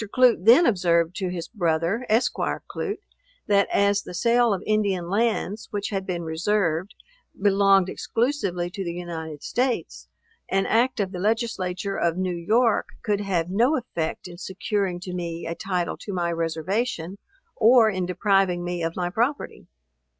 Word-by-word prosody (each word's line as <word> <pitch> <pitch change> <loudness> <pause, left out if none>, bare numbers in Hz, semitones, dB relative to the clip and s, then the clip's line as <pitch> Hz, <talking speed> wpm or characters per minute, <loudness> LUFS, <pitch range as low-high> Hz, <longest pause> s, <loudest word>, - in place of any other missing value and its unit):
Clute 250 -7 +4
then 250 +10 +7
observed 170 - +2
to 190 -3 -2
his 170 -2 -5
brother, 175 +4 -1
Esq. 240 +4 +2
Clute, 415 0 -4 0.4
that 200 -1 +3
as 200 0 +3
the 180 - -9
sale 235 +4 +3
of 195 - -2
Indian 200 -5 0
lands, 215 -1 0
which 205 -1 -3
had 195 -2 -3
been 175 -2 -3
reserved, 170 +2 -1 0.4
belonged 195 -1 +4
exclusively 200 -7 -1
to 195 - -4
the 170 -1 -4
United 160 -4 -6
States, 250 0 -2 0.4
an 195 0 +1
act 240 +2 +2
of 195 -2 -1
the 180 - -6
Legislature 200 -3 -1
of 170 0 0
New 185 -1 -1
York 220 +6 +2 0.2
could 205 -2 0
have 180 -4 -1
no 240 +10 +3
effect 170 -9 -4
in 175 -1 -11
securing 190 -1 -2
to 180 0 -7
me 170 -2 -4
a 165 - -3
title 180 -1 -2
to 205 - -7
my 175 -2 -1
reservation, 170 +4 -2 0.4
or 235 0 +6
in 185 -4 -1
depriving 185 -1 +1
me 175 0 -3
of 165 0 -2
my 175 -1 -2
property. 240 +8 -2
195 Hz, 155 wpm, -24 LUFS, 175-215 Hz, 0.4 s, then